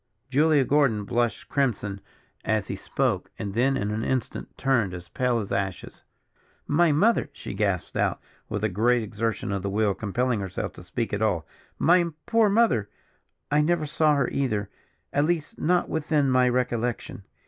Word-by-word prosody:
Julia 150 +1 +4
Gordon 135 -8 +2
blushed 120 0 -1
crimson 110 -8 -1 0.4
as 110 -3 0
he - - -2
spoke, - - -1
and 100 -2 -4
then 135 +4 +2
in 105 -4 -2
an 110 +1 -2
instant 130 -1 -3
turned 115 -9 +1
as 90 0 -9
pale 125 -2 0
as 105 -4 -4
ashes. 100 -2 -3 0.6
"My 165 +2 +3
mother!" 205 +11 +3
she - - -7
gasped 100 -3 -1
out, - - +1 0.3
with 105 0 -3
a - - +4
great 115 +5 +2
exertion 110 0 -2
of 100 -1 -1
the 100 - -2
will 105 0 +1
compelling 115 +4 -1
herself 95 -2 -4
to - - -12
speak 110 +6 -3
at 105 - -1
all. 100 -7 +1 0.3
"My 175 +2 +4 0.2
poor 225 -2 +3
mother, 200 - +2 0.6
I 150 +1 +4
never 160 0 +1
saw 150 0 +2
her 140 - +1
either, 110 -7 -1 0.4
at 145 +1 +3
least 165 -2 -2
not 180 +2 +2
within 150 -3 +1
my 130 0 +4
recollection. 120 -3 -2
120 Hz, 170 wpm, -26 LUFS, 105-145 Hz, 0.6 s, Julia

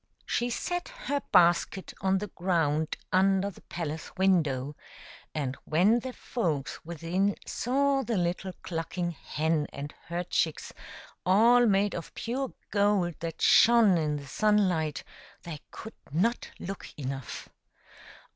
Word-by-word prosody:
She 240 0 0
set 355 +8 -2 0.2
her 285 0 0
basket 180 +1 +3
on 190 0 +2
the 205 - -3
ground 160 -4 0 0.2
under 195 +1 +3
the - - -17
palace 160 -2 -5
window, 150 -8 +2 0.6
and 135 -4 -2
when 190 +9 +4
the 260 +2 -5
folks 165 - -3
within 170 +5 -1
saw 275 +2 +1
the 235 -4 -1
little 180 +1 -1
clucking 175 +1 -3
hen 155 0 -1
and 145 +1 -7
her 175 +1 -2
chicks, 165 -2 -1 0.5
all 235 +6 +5
made 200 0 +2
of 170 - -7
pure 260 +3 -3 0.2
gold 200 -4 +2
that 165 0 -5
shone 230 -4 +6
in 150 -2 0
the 145 -1 -6
sunlight, 180 -5 +1 0.4
they 160 -3 -6
could 220 +1 -9 0.2
not 220 +11 0
look 195 +2 -6
enough. 135 -3 -5
180 Hz, 130 wpm, -29 LUFS, 160-210 Hz, 0.6 s, shone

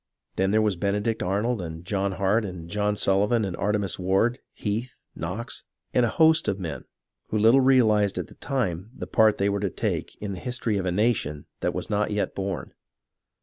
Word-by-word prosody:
Then 95 0 +1
there 110 +2 +3
was 105 -3 +1
Benedict 105 +4 0
Arnold 105 +4 0
and 80 0 -7
John 100 0 -1
Hart 100 +4 +2
and 90 -5 -6
John 105 +3 0
Sullivan 105 +3 +2
and 95 -3 -3
Artemas 100 -2 -1
Ward, 95 +7 +2
Heath, 115 +4 -3 0.2
Knox, 95 +9 -5 0.3
and 125 - +4
a 120 - +3
host 160 +4 +4
of 95 - 0
men 80 -8 -5 0.4
who 110 - -1
little 115 +5 +6
realized 110 -6 +4
at - - -2
the - - -15
time 105 - -2
the - - -5
part 110 -1 +4
they 100 - +1
were 100 0 0
to 100 -1 0
take - - -3
in 100 -1 -4
the 90 - -6
history 120 -3 -1
of 95 - -2
a - - +1
nation 90 -8 0
that - - -1
was - - -3
not 105 0 0
yet 105 -1 -1
born. 95 0 -4
105 Hz, 195 wpm, -26 LUFS, 95-110 Hz, 0.4 s, little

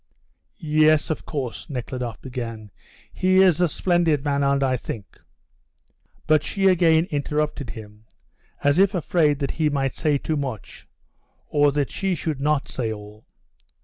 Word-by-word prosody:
"Yes, 155 -1 +3
of 155 - -5
course," 135 -6 -5
Nekhludoff 125 -3 -5
began. 115 -5 -6 0.4
"He 185 0 +1
is 180 -3 +3
a 175 - +4
splendid 165 -3 +1
man, 140 -1 +1
and 140 0 +2
I 130 -1 +2
think 110 -4 -8 0.5
" - - -40
But 155 -1 +4
she 195 -1 -2
again 165 -3 +4
interrupted 150 -2 -2
him, 105 -1 -11 0.6
as 145 +4 +3
if 195 0 +4
afraid 155 -4 +2
that 140 -1 -2
he 155 -2 0
might 135 -3 -1
say 150 -2 +1
too 155 +2 -2
much 130 -9 -6 0.6
or 145 -1 +3
that 145 -2 -1
she 190 -2 -1
should 155 -3 -3
not 150 -1 +1
say 115 -3 -2
all. 105 0 -10
145 Hz, 150 wpm, -23 LUFS, 130-155 Hz, 0.6 s, a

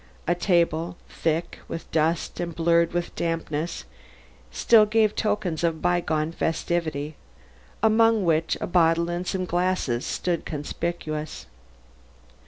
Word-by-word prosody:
A 175 - +4
table, 170 -1 +1
thick 165 +1 -2
with 165 - -7
dust 160 +1 0
and 170 -2 -3
blurred 170 0 +3
with 175 0 -3
dampness, 165 - -2 0.6
still 220 -2 +5
gave 215 -1 +2
tokens 205 -7 -1
of 165 -1 +2
a - - -11
bygone 165 -2 0
festivity 160 -3 -2 0.7
among 220 -2 +4
which 160 -1 +1
a - - -2
bottle 170 -1 +3
and 175 +1 -3
some 185 -1 -1
glasses 175 -9 0
stood 175 -2 -2
conspicuous. 155 0 -4
170 Hz, 120 wpm, -25 LUFS, 160-180 Hz, 0.7 s, still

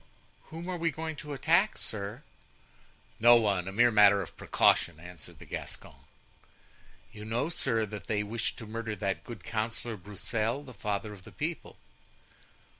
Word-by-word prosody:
"Whom 165 +2 -8
are 180 -2 -3
we 165 0 +2
going 160 +1 -4
to 150 - -7
attack, 170 +9 +3
sir?" 105 +5 -4 1.0
"No 120 +1 +9
one; 100 -6 +2
a - - -3
mere 120 +4 +5
matter 105 -2 +7
of - - -11
precaution," 75 - +3
answered 90 0 -10
the - - -12
Gascon. - - -6 1.2
"You 105 -2 -9
know, 120 +8 -1
sir, 115 -9 +1
that 105 -1 -8
they 105 -1 +1
wished 110 +2 -1
to 115 - -7
murder 110 0 -4
that 95 -1 -2
good 115 -6 -9
councillor, 110 0 -2
Broussel, 110 +6 -2
the 130 -3 -11
father 105 0 -3
of 100 - -12
the - - -12
people?" 165 +3 -4
110 Hz, 160 wpm, -30 LUFS, 105-135 Hz, 1.2 s, No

